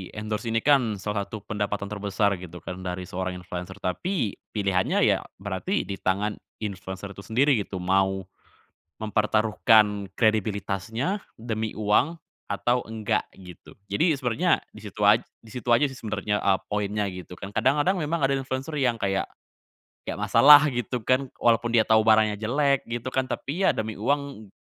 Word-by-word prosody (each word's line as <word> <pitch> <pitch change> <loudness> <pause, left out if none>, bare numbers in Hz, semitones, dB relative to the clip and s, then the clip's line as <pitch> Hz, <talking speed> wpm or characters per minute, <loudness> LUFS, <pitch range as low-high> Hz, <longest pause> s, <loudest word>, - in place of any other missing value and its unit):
endorse 105 +2 -4
ini 115 0 0
kan 130 -7 +3
salah 100 0 -3
satu 110 -3 -8
pendapatan 100 -1 -3
terbesar 100 -1 0
gitu 90 -2 -10
kan 90 - -6
dari 90 0 -4
seorang 95 +1 -4
influencer 90 +1 -7
tapi 120 - -2 0.2
pilihannya 95 -3 +1
ya, - - +4 0.2
berarti 100 - -2
di 100 -1 -6
tangan 100 +3 -1 0.2
influencer 95 0 -6
itu 100 - -11
sendiri 120 +5 +2
gitu, 100 - -5
mau 95 +1 +1 0.8
mempertaruhkan 105 -1 +2
kredibilitasnya 110 - 0 0.2
demi 110 -1 -4
uang 110 +10 +2 0.3
atau 125 +1 +1
enggak 110 -1 -1
gitu. 90 -3 -13 0.2
Jadi, 160 - +3
sebenarnya, 135 +7 +1
di 110 - -12
situ 105 0 -4
aj 105 +3 +6 0.2
di 110 - -14
situ 125 0 -7
aja 120 +5 +5
sih 135 - -2
sebenarnya, 105 -1 -2
eee, 95 -1 +2
poinnya 105 0 -1
gitu 90 -1 -9
kan, 95 +3 -8
kadang-kadang 145 - +2
memang 155 -1 -1
ada 135 - +3
influencer 135 +2 -3
yang 125 -3 +2
kayak, 95 -3 -1 0.8
kayak - - -5
masalah 145 +1 +8
gitu 125 -2 -2
kan 130 +3 0
walaupun 120 0 +2
dia 115 -2 +3
tau 110 0 +5
barangnya 110 -1 +4
jelek 140 +6 +1
gitu 120 +1 -3
kan 130 +1 0
tapi 145 +7 -3
ya - - +5
demi 110 -1 -4
uang 130 -3 -2
110 Hz, 160 wpm, -25 LUFS, 100-125 Hz, 0.8 s, masalah